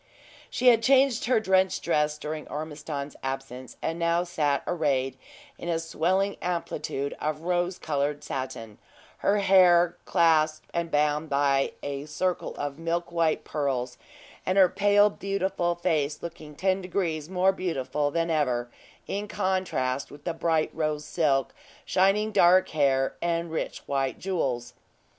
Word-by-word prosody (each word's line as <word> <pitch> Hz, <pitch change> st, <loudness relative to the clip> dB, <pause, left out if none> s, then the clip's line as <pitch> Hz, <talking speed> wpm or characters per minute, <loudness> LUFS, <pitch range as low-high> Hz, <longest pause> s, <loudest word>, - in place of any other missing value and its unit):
She 250 Hz, -, +4 dB
had 230 Hz, -2 st, +5 dB
changed 265 Hz, 0 st, +4 dB
her 245 Hz, -2 st, +3 dB
drenched 190 Hz, -2 st, +2 dB
dress 150 Hz, -2 st, +1 dB
during 155 Hz, 0 st, -5 dB
Ormiston's 150 Hz, -1 st, -5 dB
absence, 135 Hz, -1 st, -6 dB
and 165 Hz, +1 st, -2 dB
now 170 Hz, +1 st, +2 dB
sat 155 Hz, -5 st, 0 dB
arrayed 135 Hz, -6 st, 0 dB, 0.4 s
in 175 Hz, -, -5 dB
a 165 Hz, -, +1 dB
swelling 180 Hz, +5 st, 0 dB
amplitude 165 Hz, -5 st, -3 dB
of 155 Hz, 0 st, -2 dB
rose 175 Hz, +1 st, 0 dB
colored 145 Hz, -1 st, -2 dB
satin, 130 Hz, -5 st, -6 dB, 0.4 s
her 200 Hz, -, +2 dB
dark 200 Hz, -1 st, 0 dB
hair 180 Hz, -2 st, +5 dB
clasped 155 Hz, -2 st, +2 dB
and 170 Hz, -1 st, -1 dB
bound 150 Hz, 0 st, +1 dB
by 140 Hz, -1 st, +2 dB
a 140 Hz, 0 st, -4 dB
circle 180 Hz, +4 st, -2 dB
of 145 Hz, +1 st, -4 dB
milk 170 Hz, +1 st, -2 dB
white 165 Hz, -2 st, +1 dB
pearls, 130 Hz, -4 st, -2 dB, 0.4 s
and 185 Hz, +1 st, 0 dB
her 190 Hz, -2 st, +7 dB
pale, 205 Hz, +2 st, +4 dB
beautiful 190 Hz, -3 st, -1 dB
face 155 Hz, -4 st, -1 dB
looking 155 Hz, -3 st, -8 dB
ten 190 Hz, +3 st, +1 dB
degrees 170 Hz, -4 st, -2 dB
more 190 Hz, +1 st, +3 dB
beautiful 150 Hz, -6 st, -2 dB
than 165 Hz, +2 st, -1 dB
ever, 125 Hz, -6 st, 0 dB, 0.3 s
in 205 Hz, +1 st, -3 dB
contrast 185 Hz, -10 st, -1 dB
with 145 Hz, 0 st, -13 dB
the 170 Hz, -, -2 dB
bright 160 Hz, -1 st, 0 dB
rose 155 Hz, -1 st, -2 dB
silk, 140 Hz, -5 st, +1 dB, 0.3 s
shining 195 Hz, +3 st, +2 dB
dark 185 Hz, -2 st, +5 dB
hair, 135 Hz, -3 st, +1 dB
and 170 Hz, -1 st, -1 dB
rich 160 Hz, -, -3 dB
white 135 Hz, -2 st, -1 dB
jewels. 135 Hz, -11 st, -2 dB
165 Hz, 145 wpm, -27 LUFS, 145-185 Hz, 0.4 s, her